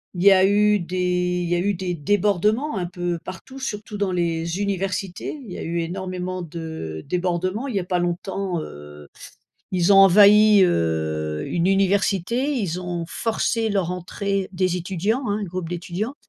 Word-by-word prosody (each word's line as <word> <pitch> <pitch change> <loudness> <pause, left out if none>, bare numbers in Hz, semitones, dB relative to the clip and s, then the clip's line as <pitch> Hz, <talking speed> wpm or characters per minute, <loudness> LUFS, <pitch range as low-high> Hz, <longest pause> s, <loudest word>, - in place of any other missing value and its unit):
il 180 - -2
y 200 - +8
a 190 0 +6
eu 210 +1 +3
des 180 0 -1
il 170 - -3
y 175 - +2
a 175 - +1
eu 200 +3 +1
des 180 0 -3
débordements 205 - +1
un 180 - -1
peu 175 -1 -3
partout, 260 +9 -9
surtout 210 -4 -5
dans 200 -2 0
les 170 0 -1
universités. 195 - -3
Il 210 - -10
y - - -6
a - - -5
eu 170 +1 -2
énormément 185 +1 -4
de 160 - -6
débordements. 185 - -1
Il 250 - -4
y - - +2
a 180 - -3
pas 180 0 -1
longtemps, 175 0 -2
heu, 75 - -11 0.7
ils 180 +1 +3
ont 195 - +7
envahi, 205 +2 +7
heu, 80 - 0
une 170 0 0
université. 195 - +1
Ils 190 -9 -2
ont 175 -2 -4
forcé 225 0 -1
leur 190 -4 0
entrée 190 +2 -3
des 185 -1 0
étudiants, 195 +8 -1
hein, 205 +1 0
un 205 - -2
groupe 180 -2 -5
d'étudiants. 180 +8 -4
185 Hz, 175 wpm, -23 LUFS, 175-200 Hz, 0.7 s, y